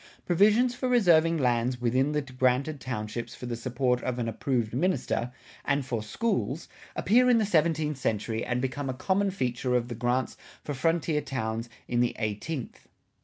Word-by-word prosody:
Provisions 215 +8 +4
for 255 +1 -2
reserving 170 -9 +4
lands 125 -2 +1
within 130 +4 +1
the 150 -1 0
granted 130 +3 0
townships 115 -1 -4
for - - -8
the 120 -1 -3
support 125 +1 0
of 125 -1 -2
an 120 -2 -1
approved 115 -1 -1
minister, 130 -5 0 0.3
and 140 -1 0
for 120 -4 -2
schools, 170 - -2 0.3
appear 250 +6 +4
in 245 - +6
the 220 - +2
seventeenth 155 -5 +1
century 110 -1 -1
and 125 0 -1
become 135 +1 -2
a 130 - -3
common 195 +7 +1
feature 125 -8 -1
of 120 0 0
the - - -3
grants 120 +2 -1 0.3
for 145 - -4
frontier 160 +2 +1
towns 115 -4 -3 0.2
in 120 - 0
the 120 0 +1
eighteenth. 110 +6 -4
130 Hz, 170 wpm, -28 LUFS, 120-165 Hz, 0.3 s, in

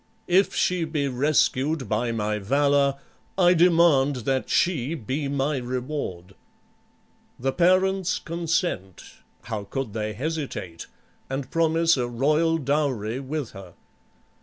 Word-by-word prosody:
If 185 +3 +2
she 180 -2 +1
be 155 -3 -1
rescued 140 +1 +1
by 110 +3 0
my 105 -1 -1
valor, 140 +5 +2 0.4
I 180 -1 +5
demand 160 -7 +3
that 135 -1 0
she 160 -4 +1
be 140 +2 -3
my 140 +1 -1
reward." 125 - -4 1.0
The 135 +2 -1
parents 185 +2 +2
consent 165 - -2 0.4
(how 105 -3 -5
could 135 -1 -4
they 110 -1 -3
hesitate?) 130 - -5 0.4
and 135 -1 -4
promise 165 -1 +3
a 125 -1 -1
royal 150 +7 +1
dowry 135 -6 -1
with 140 -1 -4
her. 95 -4 -12
140 Hz, 115 wpm, -25 LUFS, 120-165 Hz, 1.0 s, I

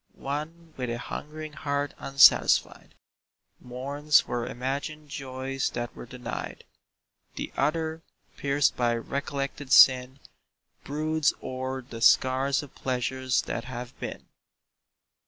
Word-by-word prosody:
One, 155 +4 -5
with 125 -2 -3
a 120 - -2
hungering 155 +5 -7
heart 145 -1 -2
unsatisfied, 135 0 +4 0.6
Mourns 140 +4 +1
for 120 -1 -3
imagined 140 +4 -4
joys 135 -1 -3
that 120 0 -4
were - - -9
denied. 125 0 -6 0.7
The - - -5
other, 160 +1 0 0.3
pierced 140 0 +1
by 120 -1 +1
recollected 140 +2 -4
sin, 130 0 +6 0.6
Broods 155 +1 0
o'er 130 0 -4
the 115 -2 -9
scars 130 +4 +4
of 145 - -12
pleasures 130 0 -1
that 115 - -4
have 125 -1 -7
been. - - -6
135 Hz, 110 wpm, -27 LUFS, 125-145 Hz, 0.7 s, sin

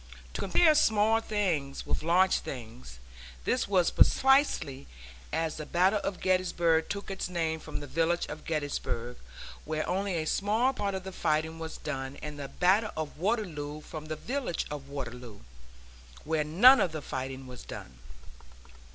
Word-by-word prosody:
To - - -4
compare 310 - +5
small 220 -6 +4
things 175 -12 -1
with - - -1
large 180 +4 +3
things, 110 - -8 0.5
this - - +1
was 185 -4 +3
precisely 260 - +3 0.4
as 160 -1 -1
the 155 - -5
Battle 185 +4 +3
of 195 -2 -3
Gettysburg 175 -3 +2
took 200 -1 -4
its 190 -1 -3
name 165 -3 -1
from - - -6
the - - -6
village 165 +5 0
of 150 +1 -8
Gettysburg, 145 -6 -3 0.5
where 155 0 -2
only 190 0 -1
a 160 -1 -1
small 215 +10 +1
part 200 -5 -2
of 190 - -4
the 190 - -6
fighting 160 -2 -1
was 160 -1 -6
done; 135 -2 -5
and 150 -1 -6
the 140 - -4
battle 195 +8 +2
of 155 -1 -4
Waterloo 165 -8 -2
from 155 0 -8
the 155 - -3
village 245 - -3
of 140 -2 -6
Waterloo, 125 -5 -7 0.8
where 160 -1 0
none 215 - +7
of 170 - 0
the 155 -2 -5
fighting 130 0 -5
was 125 -1 -10
done. 65 -2 -9
160 Hz, 160 wpm, -29 LUFS, 145-195 Hz, 0.8 s, none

